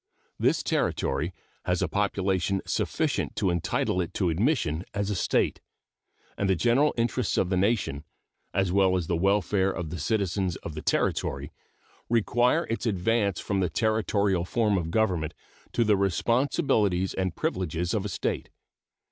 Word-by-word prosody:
This - - +2
Territory 75 +7 0 0.3
has 90 0 +1
a - - +1
population 95 0 0
sufficient - - -1
to 95 - +1
entitle 85 +1 0
it 85 - -5
to 90 -4 +1
admission 90 - 0
as 100 0 -1
a - - -1
State, 85 - +1 0.7
and 100 - -1
the 95 - +4
general 120 - +3
interests 120 0 0
of 90 - +2
the 95 - +1
nation, 95 -7 0 0.5
as 95 -1 +1
well 95 -1 +3
as 90 - -2
the 85 - 0
welfare 95 +1 +2
of 85 -4 -4
the 90 - -5
citizens 95 -1 0
of 80 - -5
the 75 - -6
Territory, - - -1 0.6
require 120 +6 +2
its 115 +1 -3
advance 100 0 +1
from 100 -2 -1
the 90 -2 +1
Territorial 105 -4 +1
form 105 +2 +1
of 85 -3 -1
government 90 -6 0 0.4
to 120 - +3
the 105 -2 +4
responsibilities 100 - +1
and 95 -3 -2
privileges 85 -1 -2
of 105 - 0
a 105 - -3
State. - - -2
95 Hz, 155 wpm, -27 LUFS, 90-110 Hz, 0.7 s, the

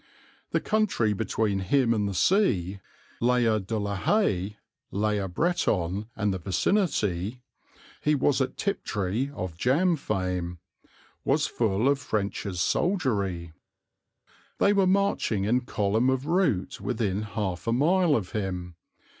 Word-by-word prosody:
The - - +1
country 205 - +1
between 105 -1 -1
him 115 +5 +2
and 105 -2 0
the 100 - -4
sea, 100 - +2 0.4
Layer 120 -2 +3
de 105 +3 -3
la 100 -1 -2
Haye, 105 - +1 0.3
Layer 105 -1 0
Breton 100 - 0
and 105 -2 0
the 95 - -3
vicinity 105 - 0 0.6
he 150 0 +2
was 140 0 +2
at 130 - -2
Tiptree 110 - -1
of 90 -7 -4
jam 155 - +2
fame 90 - -2 0.7
was - - +2
full 110 +1 0
of 140 0 +3
French's 100 -6 -3
soldiery. 100 - 0 1.0
They 200 - +4
were 195 -2 +3
marching 190 - +1
in 120 +5 +2
column 110 +2 +1
of 130 +1 0
route 165 - 0
within 105 -5 -1
half 105 -2 -4
a - - +2
mile 160 +5 +3
of 100 -7 -2
him. 90 -5 -4
110 Hz, 130 wpm, -27 LUFS, 95-140 Hz, 1.0 s, They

